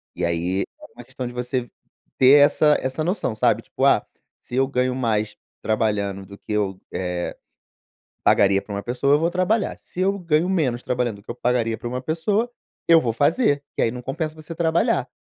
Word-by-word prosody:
E -, -, -4 dB
aí, 85 Hz, +3 st, 0 dB, 0.2 s
é -, -, -10 dB
uma -, -, -10 dB
questão 125 Hz, -, -6 dB
de 120 Hz, -, -8 dB
você, 125 Hz, 0 st, -3 dB, 0.5 s
ter 130 Hz, +2 st, +7 dB
essa 150 Hz, 0 st, +3 dB
essa 130 Hz, +4 st, -2 dB
noção, 175 Hz, -, -1 dB
sabe, 105 Hz, -, +2 dB
tipo: -, -, -5 dB
"Ah, -, -, +4 dB, 0.4 s
se 120 Hz, -, -8 dB
eu 135 Hz, +1 st, +3 dB
ganho 125 Hz, -1 st, 0 dB
mais 110 Hz, -4 st, -1 dB, 0.3 s
trabalhando 105 Hz, -3 st, -1 dB
do 100 Hz, +1 st, -12 dB
que -, -, -10 dB
eu, 100 Hz, -3 st, -1 dB
eh, 90 Hz, -1 st, -3 dB, 0.9 s
pagaria 100 Hz, -1 st, +4 dB
pra 100 Hz, -, -7 dB
uma 100 Hz, -, -3 dB
pessoa 125 Hz, +5 st, +1 dB
eu 150 Hz, -, +4 dB
vou 165 Hz, +1 st, +1 dB
trabalhar, 190 Hz, +4 st, 0 dB
se 180 Hz, -, -8 dB
eu 195 Hz, +2 st, +1 dB
ganho 165 Hz, -1 st, +1 dB
menos 130 Hz, -10 st, 0 dB
trabalhando 125 Hz, -3 st, -1 dB
do 100 Hz, -, -16 dB
que 115 Hz, -, -11 dB
eu 120 Hz, -, -5 dB
pagaria 120 Hz, -2 st, 0 dB
pra -, -, -8 dB
uma 125 Hz, +1 st, -4 dB
pessoa, 200 Hz, -, 0 dB, 0.4 s
eu 165 Hz, -1 st, +7 dB
vou 115 Hz, -5 st, -1 dB
fazer.", 145 Hz, -, +2 dB
que -, -, +1 dB
aí 115 Hz, -, +2 dB
não 125 Hz, 0 st, -7 dB
compensa 155 Hz, +4 st, -3 dB
você 155 Hz, +1 st, -9 dB
trabalhar, 170 Hz, -, +1 dB
125 Hz, 200 wpm, -23 LUFS, 110-160 Hz, 0.9 s, ter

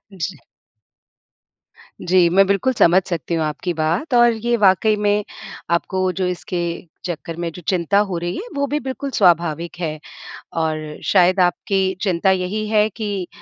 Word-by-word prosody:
जी। 185 Hz, -1 st, -4 dB, 1.6 s
जी, 180 Hz, -1 st, +4 dB
मैं 195 Hz, +3 st, +5 dB
बिल्कुल 200 Hz, +7 st, +1 dB
समझ 185 Hz, -4 st, +4 dB
सकती 170 Hz, -2 st, -3 dB
हूँ 160 Hz, -, 0 dB
आपकी 155 Hz, +4 st, -3 dB
बात 165 Hz, -, -1 dB
और 240 Hz, -1 st, +6 dB
ये 235 Hz, +2 st, -1 dB
वाकई 210 Hz, +1 st, +4 dB
में, 205 Hz, 0 st, +1 dB, 0.5 s
आपको 185 Hz, +2 st, 0 dB
जो 185 Hz, 0 st, -2 dB
इसके 180 Hz, 0 st, -4 dB, 0.5 s
चक्कर 165 Hz, -1 st, -5 dB
में 170 Hz, -1 st, -3 dB
जो 180 Hz, -, -11 dB
चिंता 190 Hz, +2 st, +2 dB
हो 175 Hz, -, -2 dB
रही 175 Hz, +1 st, -3 dB
है, 450 Hz, -, -6 dB
वो 280 Hz, -, 0 dB
भी 295 Hz, +2 st, -1 dB
बिल्कुल 270 Hz, +1 st, -5 dB
स्वाभाविक 170 Hz, -, +1 dB
है 155 Hz, -3 st, -3 dB, 0.6 s
और 155 Hz, -1 st, -3 dB
शायद 185 Hz, 0 st, +4 dB
आपकी 190 Hz, +1 st, +1 dB
चिंता 190 Hz, -1 st, +2 dB
यही 190 Hz, +3 st, -1 dB
है 215 Hz, -1 st, +3 dB
कि 205 Hz, -4 st, -4 dB
185 Hz, 155 wpm, -20 LUFS, 170-210 Hz, 1.6 s, और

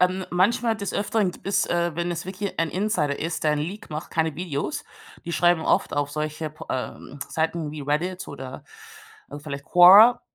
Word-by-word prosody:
Ähm, 185 Hz, +1 st, +1 dB
manchmal, 225 Hz, +6 st, +2 dB
des 200 Hz, -2 st, -4 dB
Öfteren 205 Hz, -1 st, 0 dB
gibt -, -, -15 dB
es, 195 Hz, -, +2 dB
äh, 170 Hz, -1 st, 0 dB
wenn 175 Hz, +2 st, -2 dB
es 170 Hz, 0 st, -4 dB
wirklich 195 Hz, +1 st, -5 dB
ein 165 Hz, -, +1 dB
Insider 180 Hz, -8 st, -1 dB
ist, 165 Hz, +1 st, -3 dB
der 155 Hz, -, +3 dB
'n 150 Hz, -, 0 dB
Leak 190 Hz, +9 st, -5 dB
macht, 155 Hz, +1 st, -6 dB
keine 160 Hz, -1 st, 0 dB
Videos. 170 Hz, -, -4 dB, 0.4 s
Die 170 Hz, -, -5 dB
schreiben 175 Hz, -1 st, +3 dB
oft -, -, +1 dB
auf 145 Hz, 0 st, 0 dB
solche 155 Hz, +1 st, -4 dB
p 155 Hz, -, -15 dB
ähm, 130 Hz, +2 st, -5 dB
Seiten 160 Hz, -1 st, -1 dB
wie 150 Hz, -, -7 dB
Reddit 165 Hz, +6 st, -2 dB
oder, 130 Hz, -2 st, -8 dB, 0.7 s
ähm, 145 Hz, -, -7 dB
vielleicht 140 Hz, -2 st, -7 dB
Quora 195 Hz, +9 st, +8 dB
170 Hz, 190 wpm, -24 LUFS, 150-185 Hz, 0.7 s, Quora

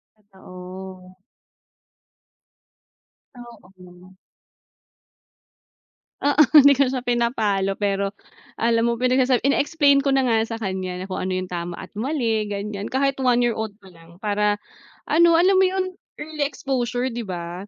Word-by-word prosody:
Totoo. 185 Hz, -2 st, -12 dB, 2.2 s
Oo. 185 Hz, -6 st, -15 dB, 2.1 s
Oo, 290 Hz, +1 st, +3 dB
hindi 285 Hz, -2 st, +8 dB
ko 280 Hz, -, +3 dB
siya 260 Hz, -, -2 dB
pinapalo. 220 Hz, -5 st, 0 dB
Pero, 200 Hz, -1 st, -1 dB, 0.5 s
alam 230 Hz, 0 st, +2 dB
mo 235 Hz, -, -4 dB
pinagsasab 255 Hz, 0 st, +2 dB
ini-explain 280 Hz, 0 st, +2 dB
ko 275 Hz, -, +1 dB
na 270 Hz, -1 st, +2 dB
nga 225 Hz, -2 st, +2 dB
sa 225 Hz, 0 st, -6 dB
kanya 190 Hz, -3 st, -4 dB
na 185 Hz, -, -6 dB
kung 185 Hz, -, -5 dB
ano 185 Hz, -, -2 dB
yung 185 Hz, 0 st, -2 dB
tama 175 Hz, -1 st, -5 dB
at -, -, -10 dB
mali 230 Hz, -3 st, -1 dB
ganiyan, 205 Hz, 0 st, -5 dB
kahit 275 Hz, +1 st, +1 dB
1 245 Hz, -1 st, +3 dB
year 240 Hz, -2 st, +1 dB
old 220 Hz, -1 st, -4 dB
pa 195 Hz, -, -18 dB
lang 170 Hz, -1 st, -18 dB
para 210 Hz, 0 st, 0 dB, 0.5 s
ano 335 Hz, +2 st, +5 dB
alam 375 Hz, +3 st, +4 dB
mo 380 Hz, -, +5 dB
yun 370 Hz, 0 st, -2 dB, 0.2 s
early 305 Hz, 0 st, -4 dB
exposure 255 Hz, -2 st, -2 dB
di 235 Hz, -2 st, -6 dB
ba? 175 Hz, +1 st, -6 dB
225 Hz, 135 wpm, -22 LUFS, 190-265 Hz, 2.2 s, hindi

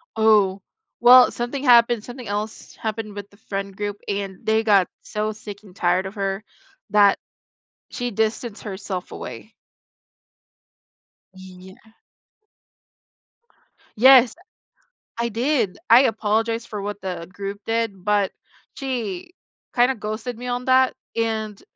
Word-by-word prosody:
Oh, 210 Hz, -3 st, +3 dB, 0.4 s
well, 250 Hz, +1 st, +8 dB
something 245 Hz, +3 st, -4 dB
happened 235 Hz, -3 st, +5 dB
something 245 Hz, -1 st, -9 dB
else 210 Hz, +2 st, -5 dB
happened 215 Hz, -1 st, -4 dB
with 205 Hz, 0 st, -8 dB
the 200 Hz, -, -22 dB
friend 195 Hz, -2 st, -5 dB
group 205 Hz, 0 st, -4 dB
and 195 Hz, -2 st, -4 dB
they 220 Hz, 0 st, +2 dB
got 200 Hz, -4 st, +4 dB, 0.2 s
so 215 Hz, 0 st, -2 dB
sick 210 Hz, -1 st, -10 dB
and 190 Hz, -4 st, -16 dB
tired 180 Hz, +1 st, +1 dB
of 195 Hz, -, -10 dB
her 195 Hz, 0 st, -2 dB, 0.5 s
that 205 Hz, -1 st, +5 dB, 0.7 s
she 245 Hz, 0 st, -3 dB
distanced 220 Hz, +1 st, -2 dB
herself 190 Hz, -3 st, -6 dB
away. -, -, -9 dB, 1.8 s
Yeah. 190 Hz, +3 st, -14 dB, 2.0 s
Yes! 255 Hz, +1 st, +7 dB, 0.8 s
I 235 Hz, 0 st, -1 dB
did! 235 Hz, -3 st, 0 dB
I 240 Hz, +3 st, +8 dB
apologized 225 Hz, 0 st, 0 dB
for 210 Hz, -2 st, -5 dB
what 205 Hz, 0 st, -5 dB
the 180 Hz, -3 st, -5 dB
group 200 Hz, +1 st, -6 dB
did, 225 Hz, -5 st, -2 dB
but 205 Hz, -2 st, +1 dB, 0.4 s
she 245 Hz, -, -4 dB, 0.4 s
kinda 250 Hz, +1 st, +3 dB
ghosted 220 Hz, +2 st, -5 dB
me 245 Hz, +2 st, -8 dB
on 245 Hz, 0 st, -3 dB
that, 260 Hz, 0 st, +4 dB, 0.2 s
and, 220 Hz, -2 st, -2 dB
215 Hz, 120 wpm, -22 LUFS, 200-235 Hz, 2.0 s, well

